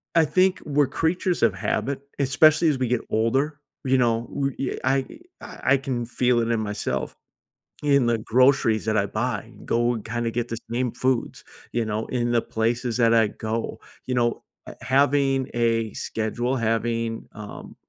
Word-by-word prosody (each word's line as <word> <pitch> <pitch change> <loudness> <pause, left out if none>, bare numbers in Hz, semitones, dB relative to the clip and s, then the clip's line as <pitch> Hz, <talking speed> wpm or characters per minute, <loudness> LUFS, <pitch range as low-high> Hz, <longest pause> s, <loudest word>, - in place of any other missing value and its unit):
I 165 - +6
think 185 +4 +2
we're 145 -2 +2
creatures 175 -1 0
of 110 -5 +4
habit, 130 +8 -1 0.2
especially 155 +4 +4
as 145 - +1
we 125 - 0
get 125 -2 +1
older. 135 +7 0 0.3
You 130 0 +3
know? 115 -2 +1
We 135 -1 -2
uh - - -5
I 135 0 +2 0.4
I - - -8
I - - -11
I - - +5
can 125 -3 -3
feel 125 0 +1
it 115 - -1
in 115 - +1
myself, 105 -1 -3 0.7
in 140 -4 +3
the 115 -1 +2
groceries 120 -1 +3
that 110 0 +1
I 100 - +2
buy, 120 +5 -2
and 120 - -16
go 120 +1 +2
and 110 - -7
kinda 115 0 -2
get 120 0 -2
the 115 - -3
same 125 0 0
foods, 125 0 -1 0.3
you 120 -1 0
know, 110 +1 -3
in 120 -1 -1
the 120 - +3
places 115 +2 -1
that 115 -2 +4
I 115 -2 +5
go. 110 +2 -4 0.3
You 125 - -1
know, 120 -1 0 0.2
uh, - - -6
h - - -24
having 135 0 +2
a 115 -2 +1
schedule, 120 +4 -2
having, 115 0 -1
um, 105 -1 -9
120 Hz, 185 wpm, -24 LUFS, 115-135 Hz, 0.7 s, I